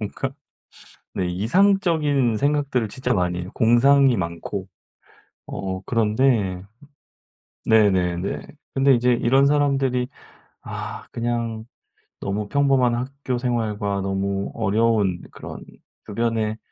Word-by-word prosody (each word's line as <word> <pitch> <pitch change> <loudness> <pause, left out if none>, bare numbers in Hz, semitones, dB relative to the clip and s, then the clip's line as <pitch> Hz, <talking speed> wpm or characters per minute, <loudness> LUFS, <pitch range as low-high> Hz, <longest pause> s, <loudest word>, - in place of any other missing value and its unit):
뭔가? 110 +5 -3 0.8
네. 90 - -1
이상적인 145 - +2
생각들을 140 -3 0
진짜 125 +2 -2
많이 90 -1 0
해요 90 - -8
공상이 130 +2 +5
많고. 90 +2 -4 0.8
어 95 -1 -4
그런데 110 -4 +1 1.1
네네네. 95 -5 +2 0.3
근데 135 0 +4
인제 125 +1 +3
이런 135 +4 +3
사람들이 135 -3 +1 0.5
아 - - -7
그냥 115 -2 -3 0.5
너무 100 +1 -3
평범한 135 -4 +3
학교생활과 120 -6 -2
너무 95 0 -2
어려운 105 -3 +1
그런 - - -9 0.4
주변에 110 0 -1
115 Hz, 225 characters per minute, -23 LUFS, 100-135 Hz, 1.1 s, 공상이